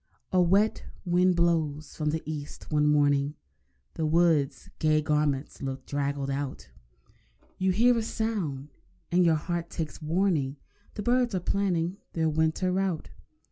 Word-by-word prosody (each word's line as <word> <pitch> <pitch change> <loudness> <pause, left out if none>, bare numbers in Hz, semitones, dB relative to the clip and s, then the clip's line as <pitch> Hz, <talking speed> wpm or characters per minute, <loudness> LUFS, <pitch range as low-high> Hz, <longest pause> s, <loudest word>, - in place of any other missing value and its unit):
A 185 - +4
wet 195 +5 +2 0.2
wind 180 +1 +3
blows 160 -4 0
from 150 -1 -1
the 160 +1 -2
East 150 -1 -7
one 150 -1 +3
morning, 145 -1 +3 0.6
The 160 - -2
wood's 160 -3 +2
gay 155 -1 +3
garments 150 -2 -1
looked 135 -1 -4
draggled 140 -1 -2
out. 135 - -4 0.9
You 190 0 +2
hear 240 +6 +4
a 230 - +1
sound, 195 -12 -3 0.4
and 180 +1 +4
your 165 -2 +4
heart 170 +2 -3
takes 160 -2 -5
warning— 155 -4 0 0.4
The 210 - -4
birds 245 -1 +2
are - - +1
planning 180 -1 0 0.2
their 160 -1 +1
winter 160 +4 +1
route. 185 -3 -1
160 Hz, 140 wpm, -28 LUFS, 150-185 Hz, 0.9 s, A